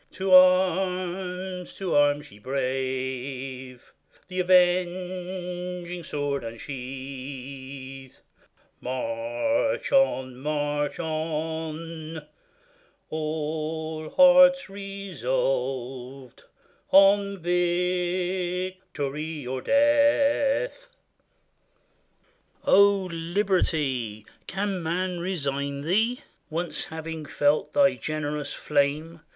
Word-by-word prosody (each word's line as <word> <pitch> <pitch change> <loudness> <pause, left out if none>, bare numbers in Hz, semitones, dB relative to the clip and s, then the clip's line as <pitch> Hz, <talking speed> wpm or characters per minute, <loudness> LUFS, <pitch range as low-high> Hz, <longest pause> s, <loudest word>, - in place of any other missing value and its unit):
To 190 0 -2
arms! 185 0 +3
to 190 -3 -3
arms! 145 0 +2
ye 105 - -15
brave! 130 0 -4 0.4
The 185 0 -4
avenging 180 0 0
sword 145 -3 -2
unsheathe; 130 +2 -7 0.7
March 285 - -1
on! 130 - +2
march 145 +1 -1
on! 160 0 -4 0.9
all 155 0 -3
hearts 270 -3 +6
resolved 195 - -3 0.4
On 200 +1 +5
victory 180 -3 -1
or 130 +1 -3
death. 290 - +3 1.8
O 200 -1 +5
Liberty! 160 - 0 0.2
can 195 -1 -2
man 180 +2 -1
resign 140 -6 -2
thee, 220 - +1 0.3
Once 170 +2 -3
having 160 -1 -6
felt 145 +1 +1
thy 280 -1 +5
generous 150 -1 -3
flame? 150 +3 0
165 Hz, 65 wpm, -26 LUFS, 140-185 Hz, 1.8 s, hearts